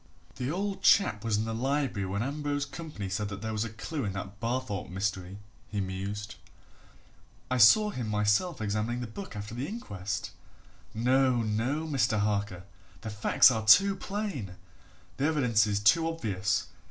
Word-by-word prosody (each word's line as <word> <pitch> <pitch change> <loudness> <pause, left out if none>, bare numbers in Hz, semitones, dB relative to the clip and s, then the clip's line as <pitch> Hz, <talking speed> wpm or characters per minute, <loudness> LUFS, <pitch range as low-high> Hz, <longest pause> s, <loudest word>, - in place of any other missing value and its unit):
"The 125 0 -2
old 195 +3 -2
chap 110 - +4
was 110 -2 +1
in 110 - -1
the 115 - -3
Library 130 -4 -1
when 100 +3 -2
Ambrose 145 +1 -2
Campany 150 - -7
said 100 +2 -2
that 100 0 -7
there 110 - -2
was 110 0 0
a 115 - -4
clue 130 +7 -5
in 100 -3 -2
that 100 0 -7
Barthorpe 115 -5 -3
history," 95 -1 -3 0.3
he 105 - -3
mused. 100 +2 -4 1.1
"I 130 - +1
saw 210 - +7
him 120 - -4
myself 105 - +1
examining 110 +3 -1
the - - -3
book 125 - -8
after 105 +1 -6
the 125 +4 -3
inquest. 100 - -5 0.6
No, 125 +1 +2
no, 120 +9 -1
Mr. 130 -8 +1
Harker! 100 -3 -1 0.4
the 110 - -5
facts 105 +4 +5
are 110 -2 -1
too 195 - +6
plain 190 - -4 0.6
the 140 - 0
evidences 115 -9 +2
too 135 +11 +4
obvious. 105 - -1
110 Hz, 160 wpm, -29 LUFS, 105-140 Hz, 1.1 s, saw